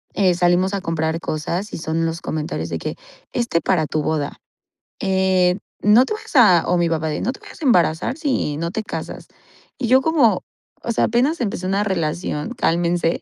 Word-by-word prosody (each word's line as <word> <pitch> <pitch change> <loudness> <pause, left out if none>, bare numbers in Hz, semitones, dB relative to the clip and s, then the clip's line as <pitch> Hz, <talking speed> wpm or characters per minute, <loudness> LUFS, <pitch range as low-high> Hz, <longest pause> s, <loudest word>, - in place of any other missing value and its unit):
eh, 190 -3 +3
salimos 180 +2 +2
a 195 - -3
comprar 160 -1 -1
cosas 170 +6 -3
y - - -3
son 160 +1 -1
los 165 +1 -3
comentarios 155 +2 -3
de - - -2
que, - - -4 0.4
este 235 -9 0
para 165 -5 +1
tu 155 +1 -1
boda, 150 -3 -2 0.6
eh, 190 -1 +2 0.2
no 215 +5 +6
te 430 - -3
vayas 425 - -9
a 185 -9 +6
o 180 - +2
mi 170 -1 +2
papá 160 -1 -1
de, 150 - -3
no 250 - 0
te - - -15
vayas - - -13
a - - -3
embarazar 180 - +2
si 260 - -1
no 170 +1 -3
te 220 - -3
casas. - - -6 0.5
Y 255 - -2
yo 260 +3 +5
como, 270 - +3 0.4
o 235 - -2
sea, - - +2
apenas 255 +6 +1
empecé 190 -4 -2
una 195 +2 +1
relación, 170 -1 -2
cálmense. 170 -3 +1
180 Hz, 195 wpm, -21 LUFS, 165-220 Hz, 0.6 s, no